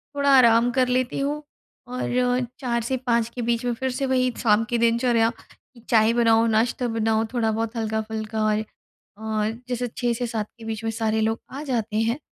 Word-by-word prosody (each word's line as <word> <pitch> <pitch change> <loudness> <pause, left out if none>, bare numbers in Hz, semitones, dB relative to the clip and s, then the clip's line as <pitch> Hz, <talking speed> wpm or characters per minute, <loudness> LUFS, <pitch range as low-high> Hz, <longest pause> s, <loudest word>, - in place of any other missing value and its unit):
थोड़ा 280 0 +1
आराम 235 0 +5
कर 255 0 +2
लेती 250 +1 0
हूँ 295 +2 -2 0.4
और 250 0 0
4 235 -3 -1
से 260 +3 -1
5 235 -1 +2
के 245 - -3
बीच 235 +1 -1
में 245 - 0
फिर 260 +3 -2
से 265 +2 -2
वही 255 -1 +1
शाम 220 -2 +3
की 240 - +1
दिनचर्या 235 0 +2 0.6
चाय 220 0 +4
बनाओ 230 -1 +4
नाश्ता 230 +3 +1
बनाओ 225 -1 +1
थोड़ा-बहुत 225 -1 -1
हल्का-फुल्का 220 -1 -2
और 215 0 +2 0.6
अ, 220 -1 -1 0.2
जैसे 245 0 -2
6 240 -1 0
से 245 +1 -2
7 220 -2 -3
के 230 - -11
बीच 225 0 -5
में 225 - 0
सारे 220 0 0
लोग 220 +1 0
आ 280 +3 -6
जाते 225 -6 -2
हैं। 230 +4 +1
230 Hz, 185 wpm, -24 LUFS, 220-250 Hz, 0.6 s, आराम